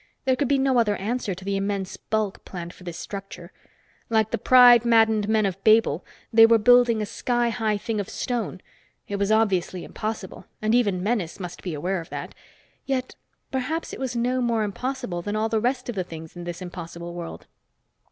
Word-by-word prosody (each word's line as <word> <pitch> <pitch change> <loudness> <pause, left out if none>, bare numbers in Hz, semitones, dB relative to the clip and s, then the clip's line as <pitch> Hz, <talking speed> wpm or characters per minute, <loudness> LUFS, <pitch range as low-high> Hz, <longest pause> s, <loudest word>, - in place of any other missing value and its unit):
There 260 -1 +3
could 275 +2 0
be 280 - +3
no 265 -2 +3
other 210 -3 +2
answer 210 -1 -2
to 185 +1 -11
the 200 0 -1
immense 195 -1 -2
bulk 215 -3 -2
planned 175 -2 -7
for - - -16
this 175 -2 -6
structure. 195 -3 -8 0.6
Like 220 -1 +2
the - - -1
pride 245 -2 +7
maddened 225 -3 +3
men 220 -1 +3
of 195 0 -3
Babel, 215 -7 +4 0.3
they 225 0 +8
were 230 0 +6
building 235 0 +5
a - - -2
sky 240 +2 0
high 220 -2 0
thing 220 +1 -3
of 200 +1 -4
stone. 225 -8 -3 0.5
It 200 - -3
was 200 +1 0
obviously 190 -5 +1
impossible, 215 -3 -6
and 215 +1 0
even 200 -7 +2
Menes 205 -6 -1
must 180 -1 -7
be 175 -4 -4
aware 180 +5 -2
of 165 - -12
that. - - -6 0.5
Yet 260 -2 -1 0.4
perhaps 275 +6 -2
it - - -7
was 260 -2 -3
no 250 +2 0
more 235 -2 +1
impossible 245 -3 -3
than 205 +4 -3
all 220 +1 0
the 220 -1 +1
rest 250 +2 -1
of 240 - -3
the 190 -3 -2
things 160 -2 -10
in 175 0 -7
this 175 +1 -6
impossible 170 -1 -7
world. 170 -1 -7
215 Hz, 200 wpm, -24 LUFS, 185-240 Hz, 0.6 s, they